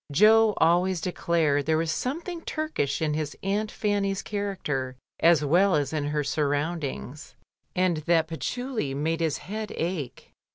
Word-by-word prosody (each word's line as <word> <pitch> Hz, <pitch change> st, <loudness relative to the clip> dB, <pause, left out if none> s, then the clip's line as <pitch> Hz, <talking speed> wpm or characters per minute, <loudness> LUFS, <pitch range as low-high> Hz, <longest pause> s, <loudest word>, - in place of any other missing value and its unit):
Jo 215 Hz, +6 st, +5 dB
always 175 Hz, +2 st, +3 dB
declared 160 Hz, -5 st, 0 dB
there 160 Hz, 0 st, +3 dB
was 160 Hz, 0 st, 0 dB
something 330 Hz, -, -3 dB
Turkish 310 Hz, -, -2 dB
in 155 Hz, -1 st, +1 dB
his 150 Hz, -1 st, -3 dB
aunt 205 Hz, +3 st, 0 dB
Fanny's 200 Hz, -2 st, -1 dB
character 165 Hz, -11 st, -3 dB, 0.2 s
as 165 Hz, -3 st, +5 dB
well 180 Hz, +6 st, +4 dB
as 145 Hz, -1 st, 0 dB
in 150 Hz, -2 st, -1 dB
her 150 Hz, 0 st, -1 dB
sur 145 Hz, +1 st, 0 dB
roundings, 145 Hz, -, -3 dB, 0.4 s
and 180 Hz, -2 st, +2 dB
that 165 Hz, +1 st, +2 dB
patchouli 220 Hz, -, -3 dB
made 160 Hz, +3 st, -1 dB
his 160 Hz, -3 st, 0 dB
head 215 Hz, +2 st, -5 dB
ache. 165 Hz, -7 st, -4 dB
165 Hz, 150 wpm, -26 LUFS, 150-200 Hz, 0.4 s, Jo